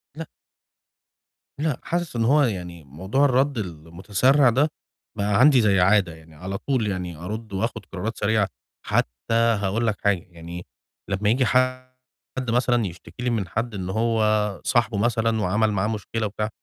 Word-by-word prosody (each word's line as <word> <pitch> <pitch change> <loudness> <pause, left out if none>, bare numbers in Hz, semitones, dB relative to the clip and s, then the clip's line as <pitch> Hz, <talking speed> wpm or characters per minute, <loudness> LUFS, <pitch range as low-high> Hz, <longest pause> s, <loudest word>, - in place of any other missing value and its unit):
لأ. 165 - -6 1.3
لأ، 150 -4 -1
حاسِس 175 -5 -3
إن 115 - +1
هو 145 +5 +4
يعني 90 - -3
موضوع 95 - 0
الرَد 135 0 +2
المتسرع 100 - +1
ده، 140 +6 +2 0.5
بقى 100 +2 +1
عندي 135 -2 +6
زي 100 -3 +3
عادة 95 -2 +3
يعني 80 0 -17
على 95 +5 -5
طول 125 -2 -1
يعني 90 -4 -3
أرُد 105 +5 -6
وآخُد 115 +5 -3
قرارات 105 +5 -4
سريعة، 105 -1 +1 0.4
حتّى - - -1
هاقول 115 -1 +2
لك 105 - -1
حاجة، 100 -4 +1
يعني 85 +1 -9 0.4
لمّا 100 +2 0
ييجي 125 +2 +3
حد 130 +1 +1 0.6
مثلًا 120 -1 +2
يشتكي 90 +7 -9
لي 125 - +1
من 110 -5 -1
حد 115 +5 -3
إن 95 -2 -4
هو 110 -1 +1
صاحبه 115 -3 +1
مثلًا، 115 0 +1
وعمل 105 +4 +1
معاه 100 0 0
مشكلة 110 +1 -3
وبتاع، 105 +1 -3
105 Hz, 155 wpm, -24 LUFS, 95-120 Hz, 1.3 s, عندي